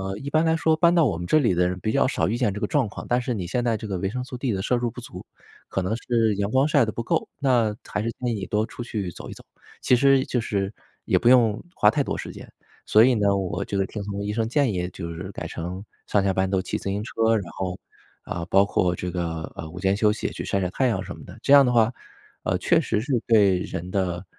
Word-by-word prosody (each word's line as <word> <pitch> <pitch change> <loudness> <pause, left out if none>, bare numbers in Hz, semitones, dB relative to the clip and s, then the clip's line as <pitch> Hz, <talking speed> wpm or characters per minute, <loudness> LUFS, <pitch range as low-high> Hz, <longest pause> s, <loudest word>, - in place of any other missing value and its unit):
“呃， 95 0 -4
一 140 - -6
般 155 +2 +3
来 160 0 +2
说 160 0 +2
搬 170 +2 +4
到 170 -2 +5
我 105 - 0
们 85 - -5
这 155 - +4
里 120 -9 +2
的 90 0 +2
人 90 0 -4
比 110 - -1
较 140 - +3
少 - - 0
遇 115 +5 -1
见 115 -6 +1
这 - - -4
个 - - +2
状 130 0 +1
况。 - - -8
但 125 +1 +1
是 125 -1 -2
你 95 -4 -4
现 120 +8 -1
在 115 -2 +1
这 110 - -7
个 95 -3 -3
维 95 - -1
生 125 +5 -4
素 130 -1 -8
D 130 -2 -1
的 95 - -2
摄 125 - 0
入 120 -1 -1
不 - - -10
足， - - -10 0.4
可 95 - -2
能 95 +4 -1
是 115 -2 +1
阳 100 0 -1
光 130 +4 +3
晒 145 -6 +3
得 110 - -3
不 115 - -4
够。 - - -1
那 120 -6 +2
还 105 - -3
是 115 - -1
建 125 -1 -3
议 115 - -1
你 100 -2 -4
多 105 0 0
出 120 - -7
去 105 -6 -4
走 - - -10
一 - - -7
走， - - -15 0.4
其 - - +4
实 135 +1 +4
就 125 - -1
是 100 -2 -2 0.3
也 - - +2
不 120 - +2
用 120 -4 +4
花 105 - +5
太 140 - 0
多 - - -3
时 - - -6
间。” - - -11 0.4
所 110 +1 +6
以 130 0 +4
呢， 100 -3 +2
我 95 -2 -2
这 100 - -3
个 95 - +2
听 105 +2 -6
从 100 0 -4
医 105 - -2
生 110 +1 -1
建 135 -2 +2
议 90 -2 -2
就 85 -2 -7
是 95 +3 -7
改 - - -6
成 90 +4 -6 0.2
上 100 -2 +1
下 95 - +2
班 95 0 0
都 95 -1 0
骑 - - -3
自 - - -13
行 100 +2 -2
车 - - -9 0.2
儿， - - +4
然 95 -4 -7
后， 95 -1 -4 0.4
啊， 85 -1 -5
包 100 - +5
括 90 -3 0
这 90 - -4
个， 85 -2 -3
呃， 80 - -6
午 90 +3 -9
间 95 +1 +1
休 105 +1 +3
息 105 - -2
也 - - -5
去 - - -6
晒 100 - -1
晒 90 -2 -1
太 130 - 0
阳 120 - 0
什 - - -7
么 - - -12
的。 - - -12
这 - - +2
样 140 -2 +8
的 125 - +2
话， 115 0 +3 0.5
呃， - - +1
确 - - +3
实 105 - -1
是 135 +3 -4
对 100 -5 +4
人 90 0 -5
的 95 -2 -1
105 Hz, 315 characters per minute, -24 LUFS, 95-125 Hz, 0.5 s, 样